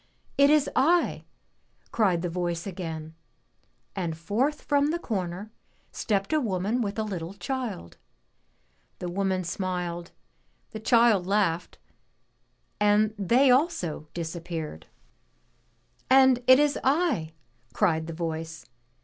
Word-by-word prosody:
"It 280 +1 +5
is 300 -1 +4
I!" 335 +6 +2 0.7
cried 185 -6 +1
the - - 0
voice 170 -1 -3
again, 165 -5 -6 0.8
and 170 -5 -3
forth 235 - -1
from 285 0 +2
the 325 +3 0
comer 200 - -4 0.4
stepped 200 +4 -1
a 310 - +4
woman 210 0 -1
with 205 -2 -3
a 220 - 0
Httle 190 -2 -5
child. 245 - -4 1.0
The 175 - -5
woman 190 0 0
if - - -8
smiled, 175 -1 -3 0.6
the 220 - -6
child 225 -4 +4
laughed, 190 -4 0 1.0
and 210 +1 +3
they 240 +7 +4
also 245 - 0
disappeared. 165 - -5 1.2
And 260 -1 +6
it 255 0 +9
is 290 0 +2
I!" 270 - +1 0.4
cried 160 -6 +1
the 165 - -5
voice. 160 -1 -5
195 Hz, 115 wpm, -27 LUFS, 170-250 Hz, 1.2 s, it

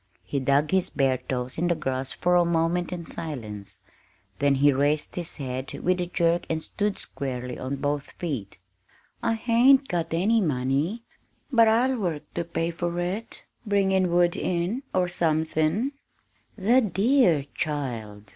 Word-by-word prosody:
He 140 - -2
dug 140 +3 +2
his 190 -1 +2
bare 135 -3 +1
toes 125 +1 -4
in 175 - +1
the 170 - +2
grass 135 -3 -2
for 180 0 0
a 175 0 +5
moment 170 +1 0
in 175 -2 -5
silence, 110 -13 -6 0.6
then 140 -1 +3
he 140 +1 +4
raised 145 +3 0
his 175 -2 -3
head 130 -2 -5
with 180 0 0
a 175 - -2
jerk 170 0 +1
and 160 -1 -1
stood 205 -1 -2
squarely 125 -2 -4
on 130 +2 -3
both 145 +1 -2
feet. 135 - -5 0.6
"I 225 - +1
hain't 250 +4 +4
got 170 -2 -2
any 205 +7 +2
money, 145 - 0 0.5
but 230 -3 +6
I'll 245 +3 +3
work 170 -7 -2
to 170 - -2
pay 170 0 -2
for 175 +1 -3
it 190 +6 -4 0.2
bringin' 190 -3 +2
wood 175 0 +3
in, 185 +8 -1
or 180 -1 +1
somethin'." 160 - +1 0.7
"The 230 +6 +4
dear 195 - +3
child!" 120 -9 -4
170 Hz, 155 wpm, -26 LUFS, 140-190 Hz, 0.7 s, but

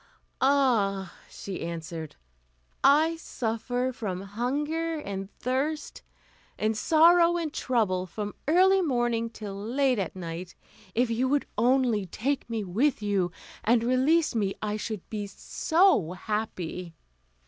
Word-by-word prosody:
"Ah!" 225 -9 +2 0.2
she 195 -2 -7
answered, 165 -2 -6 0.7
"I 315 +4 +5
suffer 245 -2 -2
from 195 -6 -4
hunger 295 +11 -2
and 195 -8 -5
thirst, 275 +5 -2 0.6
and 215 +1 0
sorrow, 335 +6 +5
and 320 -3 -3
trouble, 200 -10 0
from 205 +2 -5
early 380 +4 +5
morning 240 -6 0
till 215 -3 -7
late 250 +4 +1
at 190 - -3
night; 175 0 -6 0.4
if 240 +1 +2
you 250 +3 +1
would 285 +1 +1
only 235 -3 +2
take 260 +9 -2
me 225 -2 -2
with 220 +7 0
you, 195 -4 +1 0.3
and 230 +1 +3
release 265 +7 +3
me, 200 -4 0
I 210 -1 -2
should 215 -2 -5
be 210 -2 -3
so 315 - +2
happy." 185 -4 -4
230 Hz, 125 wpm, -27 LUFS, 200-280 Hz, 0.7 s, I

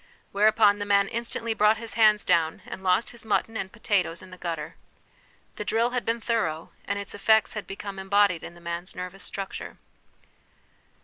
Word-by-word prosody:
' - - -37
whereupon 205 0 +4
the - - -1
man 200 -1 +4
instantly 230 0 -3
brought 215 0 +4
his 230 0 -5
hands 215 -2 +4
down, 160 -1 +2
and - - -8
lost 190 +4 +2
his 235 0 -8
mutton 225 +1 0
and 190 -3 -4
potatoes 195 -7 -1
in 185 - -13
the - - -8
gutter. 165 -3 -4 0.8
The - - -3
drill 230 +2 +1
had 250 -1 -2
been 230 +1 0
thorough, 175 -9 -1
and - - -2
its 200 0 -5
effects 220 +1 +3
had 215 -2 -5
become 195 0 -6
embodied 195 -3 +2
in 170 - -9
the 175 - -15
man's 170 +2 -5
nervous 180 +2 -7
structure. 195 -1 -6
205 Hz, 185 wpm, -26 LUFS, 185-220 Hz, 0.8 s, whereupon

